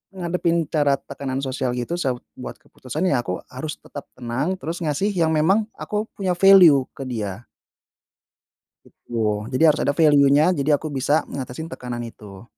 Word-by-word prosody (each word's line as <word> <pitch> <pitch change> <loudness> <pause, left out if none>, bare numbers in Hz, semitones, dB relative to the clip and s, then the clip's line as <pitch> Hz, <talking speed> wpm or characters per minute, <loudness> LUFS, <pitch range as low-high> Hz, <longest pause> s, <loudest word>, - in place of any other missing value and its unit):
ngadepin 170 -1 0
cara 145 -3 +3
tekanan 135 -1 -5
sosial 130 -2 -2
gitu 125 +8 -3
sa 130 -6 0 0.2
buat - - -7
keputusan, 130 +7 -6
ya 135 - +2
aku 90 - -3
harus 150 +4 -5
tetap 145 - -10
tenang, 130 +9 -2
terus 165 +2 -5
ngasih 160 +7 0
yang 165 -3 +1
memang 195 +8 +2
aku 210 +1 -3
punya 190 -2 -1
value 180 -9 +7
ke 135 - -6
dia. 110 -2 -5 1.4
Gitu, 105 -2 -3
jadi 130 +5 0
harus - - -5
ada 145 - 0
value-nya, 145 0 +5
jadi 150 -3 +2
aku 155 +1 -5
bisa 145 +3 +1
ngatasin 140 +5 -6
tekanan 120 -1 -6
itu. 105 -3 -11
140 Hz, 155 wpm, -22 LUFS, 125-165 Hz, 1.4 s, value